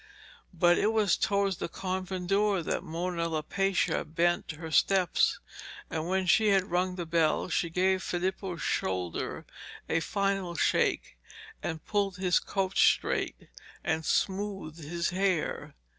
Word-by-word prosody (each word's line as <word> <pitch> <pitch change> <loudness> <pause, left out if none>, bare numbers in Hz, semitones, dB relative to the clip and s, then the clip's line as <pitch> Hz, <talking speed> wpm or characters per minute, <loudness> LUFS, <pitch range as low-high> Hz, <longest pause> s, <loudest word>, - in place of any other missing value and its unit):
But 175 -1 +3
it 215 - +2
was 210 -5 +3
towards 200 -2 +1
the - - -3
convent 185 0 -4
door 200 -2 +2
that - - -1
Mona 170 0 -3
Lapaccia 185 +5 0
bent 170 +1 0
her 160 +1 -8
steps, 185 +4 +3 0.5
and, 160 +1 -2
when 190 +1 0
she 215 +4 +4
had 195 -3 +2
rung 180 +1 +1
the 175 -2 -4
bell, 165 +1 +1
she 170 0 0
gave 185 +2 +1
Filippo's 180 -1 -3
shoulder 90 -2 -2 0.4
a 165 - +1
final 195 -1 -1
shake, - - +1 0.4
and 160 -1 -5
pulled 200 -3 0
his 180 -1 +2
coat 195 -1 -2
straight - - +2 0.4
and 160 0 0
smoothed 195 -3 -1
his 170 +3 -2
hair. 185 -3 -1
180 Hz, 135 wpm, -29 LUFS, 165-195 Hz, 0.5 s, she